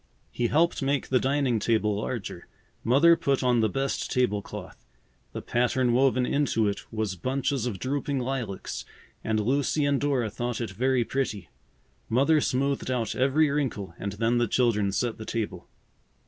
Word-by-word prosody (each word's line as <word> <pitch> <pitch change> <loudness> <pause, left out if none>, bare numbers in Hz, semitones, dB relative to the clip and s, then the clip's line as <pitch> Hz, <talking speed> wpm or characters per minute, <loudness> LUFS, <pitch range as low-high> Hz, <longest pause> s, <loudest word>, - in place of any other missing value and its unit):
He 120 - 0
helped 165 +6 +2
make 140 0 0
the 130 - +3
dining 135 -3 +1
table 105 -1 +1
larger. 105 -5 -5 0.4
Mother 145 +8 +6
put 140 -6 0
on 125 -1 +3
the 110 -1 +2
best 135 +6 -2
table 125 -6 +1
cloth. - - -10 0.5
The - - -6
pattern 125 0 +1
woven 130 0 +3
into 125 -6 +1
it 100 - -4
was 110 -4 -2
bunches 130 - -1
of 105 -6 -3
drooping 140 +5 -2
lilacs 125 -6 -3 0.4
and 110 -1 0
Lucy 140 +6 +1
and 140 -1 +1
Dora 130 -7 0
thought 120 +1 -3
it 115 -4 -3
very 125 +4 +1
pretty. 110 - -3 0.6
Mother 140 +6 +3
smoothed 135 +1 0
out 120 -3 -1
every 140 +4 +3
wrinkle 120 - -2
and 100 -1 -3
then 115 +3 +1
the 120 - +2
children 105 -4 +2
set 115 +3 -1
the - - -5
table. 100 -7 -4
125 Hz, 160 wpm, -27 LUFS, 110-135 Hz, 0.6 s, Mother